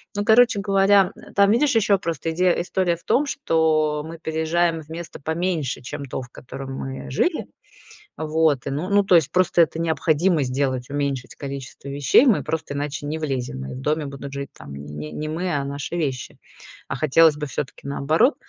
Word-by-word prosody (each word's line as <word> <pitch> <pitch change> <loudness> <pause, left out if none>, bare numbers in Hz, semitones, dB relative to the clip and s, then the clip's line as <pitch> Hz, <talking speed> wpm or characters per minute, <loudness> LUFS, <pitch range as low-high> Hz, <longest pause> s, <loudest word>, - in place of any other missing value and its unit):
Ну, 205 0 -1
короче 230 -1 +5
говоря, 195 -1 +4 0.2
там 200 0 +5
видишь 270 +5 +3
еще 205 -2 +4
просто 165 -2 -3
иде 180 +2 +3
история 180 0 0
в 170 - -23
том, 285 - +3
что 160 - +1
мы 165 +1 -8
переезжаем 160 +1 0
в 150 - -17
место 165 -2 -8
поменьше, 160 -4 -2
чем 140 +3 -6
то, 130 0 -4
в 125 - -9
котором 135 +2 -8
мы 135 0 -6
жили. 315 - 0 0.7
Вот, 155 -3 +1
ну 150 +7 -2
ну, 205 0 +4
то 190 -2 +4
есть 160 -5 +4
просто 180 -1 +3
это 160 - -3
необходимо 160 0 +2
сделать- 130 -1 -1
уменьшить 140 -3 -3
количество 140 -1 -7
вещей. 140 - +4
Мы 235 -7 +3
просто 160 -3 -3
иначе 145 0 -3
не 155 +2 -2
влезем. 130 - -3
И - - -6
в 130 - -7
доме 150 +2 0
будут 140 0 -7
жить 140 -1 -5
там 70 - -10
не 75 +2 -7
не 155 - -4
мы, 175 +3 -2
а 140 -1 -1
наши 140 +4 -4
вещи. 135 -6 -3 0.5
А - - -3
хотелось 155 +1 +4
бы 150 0 -4
всё-таки 135 -1 -5
наоборот. 155 - +2
155 Hz, 185 wpm, -23 LUFS, 140-175 Hz, 0.7 s, короче